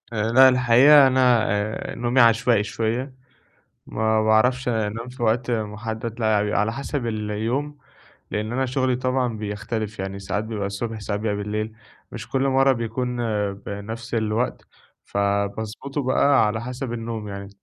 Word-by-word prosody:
آآ 110 Hz, 0 st, -1 dB
لا 130 Hz, +2 st, +8 dB
الحقيقة 130 Hz, +3 st, +6 dB
أنا 125 Hz, -3 st, +3 dB
آآ 105 Hz, +1 st, -2 dB
نومي 120 Hz, +2 st, +2 dB
عشوائي 115 Hz, -1 st, +4 dB
شوية، 115 Hz, +5 st, -3 dB, 0.7 s
ما 110 Hz, 0 st, 0 dB
باعرفش 125 Hz, +4 st, +3 dB
أنام 115 Hz, 0 st, -2 dB
في 125 Hz, -1 st, -7 dB
وقت 115 Hz, +2 st, +1 dB
محدد 110 Hz, +1 st, -4 dB
لا 110 Hz, -2 st, +2 dB
بيبقي 105 Hz, -1 st, 0 dB
على 110 Hz, +2 st, -1 dB
حسب 140 Hz, 0 st, -4 dB
اليوم 115 Hz, +7 st, -2 dB, 0.5 s
لأن 105 Hz, +1 st, -2 dB
أنا 130 Hz, +1 st, 0 dB
شغلي 130 Hz, 0 st, 0 dB
طبعًا 130 Hz, -2 st, -1 dB
بيختلف، 105 Hz, +1 st, -4 dB
يعني 95 Hz, +1 st, -4 dB
ساعات 100 Hz, +2 st, -3 dB
بيبقى 110 Hz, -3 st, -3 dB
الصبح 110 Hz, +3 st, -4 dB
ساعات 105 Hz, 0 st, -3 dB
بيبقي 105 Hz, -1 st, -1 dB
بالليل، 105 Hz, +2 st, -3 dB, 0.4 s
مش -, -, -8 dB
كل 135 Hz, -, 0 dB
مرة 135 Hz, 0 st, +4 dB
بيكون 125 Hz, +1 st, -3 dB, 0.4 s
بنفس 105 Hz, +4 st, -7 dB
الوقت، 110 Hz, +1 st, -1 dB, 0.4 s
فباضبطه 100 Hz, +7 st, -2 dB
بقى 135 Hz, 0 st, +3 dB
على 110 Hz, +2 st, -2 dB
حسب 125 Hz, 0 st, -5 dB
النوم 115 Hz, -2 st, -5 dB
يعني 100 Hz, -1 st, -7 dB
115 Hz, 145 wpm, -23 LUFS, 105-125 Hz, 0.7 s, لا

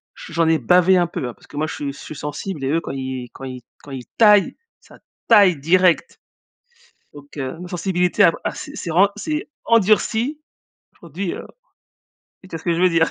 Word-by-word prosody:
j 165 Hz, -, -11 dB
j'en 165 Hz, -1 st, +2 dB
ai 160 Hz, 0 st, +4 dB
bavé 180 Hz, +1 st, +4 dB
un 175 Hz, -1 st, +2 dB
peu, 135 Hz, -, -4 dB
hein, 120 Hz, -, -6 dB
parce -, -, -22 dB
que 145 Hz, -, -11 dB
moi, 155 Hz, -, 0 dB
je -, -, -6 dB
suis 140 Hz, -1 st, -4 dB
je -, -, -14 dB
suis 155 Hz, -, -9 dB
sensible 150 Hz, +3 st, -5 dB
et 135 Hz, -, -1 dB
eux, 165 Hz, +2 st, +1 dB
quand -, -, -6 dB
ils 130 Hz, -2 st, -5 dB
quand -, -, -12 dB
ils 130 Hz, -1 st, -7 dB, 0.2 s
quand 145 Hz, -, -12 dB
ils 130 Hz, -2 st, -7 dB
taillent, 210 Hz, -3 st, +5 dB, 0.3 s
ça -, -, -18 dB, 0.3 s
taille 200 Hz, -8 st, +6 dB
direct. 175 Hz, +4 st, +2 dB, 0.9 s
Donc 145 Hz, 0 st, -14 dB
heu, 135 Hz, +4 st, -4 dB
ma 180 Hz, -, -8 dB
sensibilité 180 Hz, 0 st, +1 dB
a 165 Hz, -, +6 dB
a -, -, -2 dB
s'est 290 Hz, 0 st, -8 dB
s'est 180 Hz, -, -6 dB
vraiment, 190 Hz, +5 st, +4 dB
s'est 305 Hz, -1 st, -4 dB, 0.2 s
endurcie, 230 Hz, +6 st, +2 dB, 0.5 s
aujourd'hui, 170 Hz, +3 st, -5 dB
heu, -, -, -8 dB, 1.0 s
tu 185 Hz, -, -15 dB
vois 165 Hz, -, -5 dB
ce -, -, -16 dB
que 170 Hz, -2 st, +1 dB
je 170 Hz, -, -2 dB
veux 185 Hz, -, +4 dB
dire? 165 Hz, -1 st, +2 dB
170 Hz, 215 wpm, -20 LUFS, 145-190 Hz, 1.0 s, taille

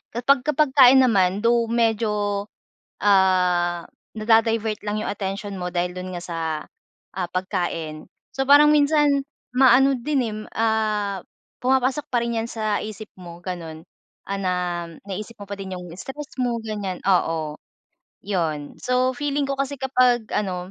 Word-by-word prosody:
kapagka 275 Hz, +4 st, +2 dB
pagkain 265 Hz, -3 st, +6 dB
naman, 195 Hz, -5 st, +3 dB
though, 235 Hz, 0 st, +3 dB
medyo, 210 Hz, -3 st, 0 dB, 0.6 s
ah, 180 Hz, -3 st, +3 dB, 0.3 s
na-da-divert 225 Hz, 0 st, +2 dB
lang 210 Hz, 0 st, -2 dB
'yong -, -, -4 dB
attention 200 Hz, 0 st, -4 dB
mo 180 Hz, 0 st, -3 dB
dahil 180 Hz, 0 st, -1 dB
do'n 185 Hz, 0 st, -6 dB
nga, 175 Hz, -, -7 dB
sa, 170 Hz, -2 st, -5 dB, 0.8 s
ah, 185 Hz, -2 st, -2 dB
pagkain, 175 Hz, -4 st, -3 dB, 0.3 s
so, 270 Hz, -, +1 dB
parang 295 Hz, +1 st, +7 dB
minsan 290 Hz, -1 st, +3 dB, 0.3 s
maano 265 Hz, +1 st, +5 dB
din 285 Hz, +3 st, 0 dB
eh, 215 Hz, -2 st, -4 dB, 0.2 s
ah, 215 Hz, -3 st, 0 dB, 0.4 s
pumapasok 265 Hz, +3 st, +1 dB
pa 245 Hz, -, +2 dB
rin 235 Hz, -1 st, -2 dB
'yan 230 Hz, -, -6 dB
sa 215 Hz, -2 st, -1 dB
isip 215 Hz, 0 st, -7 dB
mo 175 Hz, -1 st, -10 dB
ganun, 165 Hz, -4 st, -6 dB, 0.5 s
ah, 200 Hz, -, -1 dB
na 185 Hz, -1 st, 0 dB, 0.5 s
naisip 210 Hz, +4 st, -6 dB
mo 205 Hz, -, -8 dB
pa 200 Hz, -, -4 dB
din 190 Hz, -1 st, -6 dB
'yong 180 Hz, -1 st, -9 dB
stress 285 Hz, +7 st, -8 dB
mo 240 Hz, -2 st, 0 dB
ganyan, 205 Hz, -4 st, -4 dB
oo, 165 Hz, -5 st, +1 dB, 0.7 s
'yon, 160 Hz, -7 st, -2 dB
so, 250 Hz, +1 st, +2 dB
feeling 290 Hz, +1 st, -1 dB
ko 275 Hz, -, -1 dB
kasi 275 Hz, +1 st, -1 dB
kapag 250 Hz, -3 st, +2 dB
ano, 185 Hz, -3 st, -2 dB
215 Hz, 145 wpm, -23 LUFS, 185-250 Hz, 0.8 s, parang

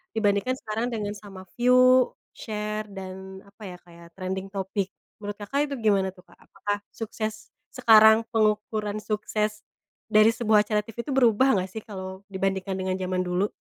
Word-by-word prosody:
dibandingkan 215 Hz, +3 st, +1 dB
sekarang 225 Hz, -1 st, -3 dB
dengan 210 Hz, -3 st, -3 dB
sama 200 Hz, -2 st, -11 dB, 0.2 s
view, 255 Hz, +1 st, +5 dB, 0.2 s
share, 210 Hz, -1 st, -4 dB
dan 190 Hz, 0 st, -9 dB
apa 200 Hz, +2 st, -16 dB
ya, -, -, -13 dB
kayak 170 Hz, -1 st, -15 dB
trending 190 Hz, 0 st, -4 dB
topic. 195 Hz, 0 st, -3 dB, 0.3 s
Menurut 205 Hz, -1 st, -5 dB
Kakak 280 Hz, +8 st, -1 dB
itu -, -, -1 dB
gimana 200 Hz, -3 st, +3 dB
tuh 180 Hz, -, -17 dB
Kak, -, -, -22 dB
apakah 205 Hz, +1 st, -4 dB, 0.2 s
sukses 220 Hz, -1 st, -5 dB, 0.2 s
sekarang 220 Hz, 0 st, +6 dB
pengukuran 215 Hz, -1 st, 0 dB
sukses 215 Hz, 0 st, -2 dB, 0.5 s
dari 215 Hz, +1 st, +6 dB
sebuah 220 Hz, -2 st, +3 dB
acara 210 Hz, -1 st, +2 dB
TV 225 Hz, +2 st, -7 dB
itu 285 Hz, -, -5 dB
berubah 250 Hz, -1 st, +4 dB
nggak 185 Hz, +1 st, -4 dB
sih, 220 Hz, +2 st, -7 dB
kalau 190 Hz, -2 st, -8 dB
dibandingkan 190 Hz, 0 st, -1 dB
dengan 185 Hz, 0 st, -1 dB
jaman 185 Hz, 0 st, -1 dB
dulu? 180 Hz, +2 st, 0 dB
210 Hz, 160 wpm, -26 LUFS, 190-220 Hz, 0.5 s, sekarang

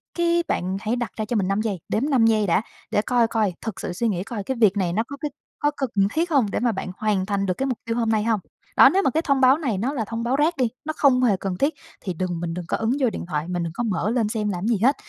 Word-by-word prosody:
cái 340 Hz, 0 st, +2 dB
bạn 185 Hz, +2 st, -1 dB
hãy 225 Hz, +3 st, 0 dB
đặt 240 Hz, -1 st, -3 dB
ra 215 Hz, -, -2 dB
cho 235 Hz, -, -3 dB
mình 195 Hz, -3 st, +1 dB
5 195 Hz, +2 st, +1 dB
giây, 205 Hz, -5 st, -2 dB
đếm 270 Hz, +8 st, 0 dB
5 245 Hz, -5 st, +4 dB
giây 215 Hz, -3 st, +2 dB
đã 170 Hz, -, +3 dB, 0.3 s
để 210 Hz, -, +2 dB
coi 240 Hz, -1 st, +2 dB
coi, 215 Hz, -5 st, 0 dB
thực 220 Hz, -3 st, -5 dB
sự 175 Hz, -, -4 dB
suy 230 Hz, +5 st, 0 dB
nghĩ 185 Hz, -3 st, -1 dB
coi 205 Hz, -1 st, -5 dB
cái 265 Hz, +2 st, -3 dB
việc 205 Hz, -1 st, +5 dB
này 175 Hz, -3 st, 0 dB
nó 220 Hz, +3 st, +1 dB
có 280 Hz, -, -7 dB
cái 295 Hz, 0 st, -4 dB, 0.3 s
có 295 Hz, 0 st, +2 dB
cần 270 Hz, -3 st, -1 dB, 0.2 s
thiết 335 Hz, +2 st, 0 dB
hông 245 Hz, -9 st, +3 dB
để -, -, -1 dB
mà 240 Hz, 0 st, +2 dB
bạn 185 Hz, -1 st, -4 dB
hoàn 205 Hz, -3 st, 0 dB
thành 200 Hz, -1 st, 0 dB
được 185 Hz, -, +1 dB
cái 270 Hz, -, 0 dB
mục 250 Hz, -, -1 dB
tiêu 230 Hz, +1 st, -2 dB
hôm 230 Hz, -2 st, +1 dB
nay 215 Hz, -1 st, +2 dB
hông? 225 Hz, -2 st, +1 dB, 0.4 s
Đó, -, -, +9 dB
nếu 390 Hz, -, +2 dB
mà -, -, +3 dB
cái 320 Hz, -, +1 dB
thông 275 Hz, -3 st, +1 dB
báo 260 Hz, +3 st, +6 dB
này 250 Hz, -, -1 dB
nó 255 Hz, +8 st, -1 dB
là 225 Hz, -6 st, -2 dB
thông 230 Hz, +2 st, -4 dB
báo 250 Hz, +3 st, +1 dB
rác 310 Hz, +1 st, +2 dB
đi, 250 Hz, -3 st, +2 dB, 0.2 s
nó 310 Hz, -, -2 dB
không 255 Hz, -3 st, +4 dB
hề 205 Hz, -6 st, +3 dB
cần 185 Hz, -2 st, -3 dB
thiết, 285 Hz, +3 st, +1 dB, 0.3 s
thì 185 Hz, -, -3 dB
đừng 175 Hz, 0 st, -3 dB
mình 165 Hz, -1 st, -3 dB
đừng 175 Hz, 0 st, -5 dB
có -, -, 0 dB
ấn 225 Hz, -, -1 dB
vô 250 Hz, -, +4 dB
điện -, -, -6 dB
thoại, 155 Hz, -1 st, -2 dB
mình 175 Hz, -1 st, -2 dB
đừng 165 Hz, -1 st, -4 dB
có 240 Hz, -, -2 dB
mở 210 Hz, -1 st, 0 dB
lên 235 Hz, -4 st, +1 dB
xem 215 Hz, -2 st, -1 dB
làm 185 Hz, +2 st, -2 dB
gì 230 Hz, -3 st, +2 dB
hết. 270 Hz, +3 st, +5 dB
225 Hz, 315 wpm, -23 LUFS, 195-260 Hz, 0.4 s, Đó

